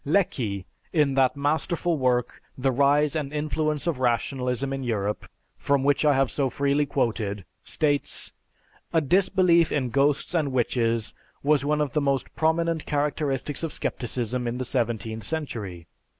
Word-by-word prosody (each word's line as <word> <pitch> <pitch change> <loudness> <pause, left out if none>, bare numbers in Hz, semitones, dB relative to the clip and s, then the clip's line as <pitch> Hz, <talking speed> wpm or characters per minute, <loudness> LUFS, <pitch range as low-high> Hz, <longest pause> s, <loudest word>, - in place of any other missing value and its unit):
Lecky, 125 - 0 0.3
in 150 -5 +2
that 135 +1 +3
masterful 160 +4 0
work, 125 -3 0 0.2
"The 135 +1 +1
Rise 145 +3 +3
and 145 -3 -2
Influence 150 0 -1
of 165 -7 -1
Rationalism 125 +2 0
in 135 - -3
Europe," 105 -4 -2 0.3
from 140 -1 +1
which 145 +1 +2
I 145 -2 +5
have 135 -1 +2
so 135 -2 0
freely 140 +3 +1
quoted, 110 -7 -1 0.2
states, 145 -2 -1 0.6
"A 165 - +5
disbelief 175 +1 +3
in 130 -4 0
ghosts 140 +5 +1
and 155 -5 +1
witches 115 -3 0 0.3
was 145 -1 +3
one 150 +1 +1
of 145 -4 -1
the 150 - +2
most 140 -2 -1
prominent 160 0 +1
characteristics 145 -1 -1
of 165 -2 -2
Scepticism 120 -1 -2
in 120 +1 -2
the 130 - -3
seventeenth 115 -3 -2
century. 105 - -4
140 Hz, 150 wpm, -25 LUFS, 125-150 Hz, 0.6 s, I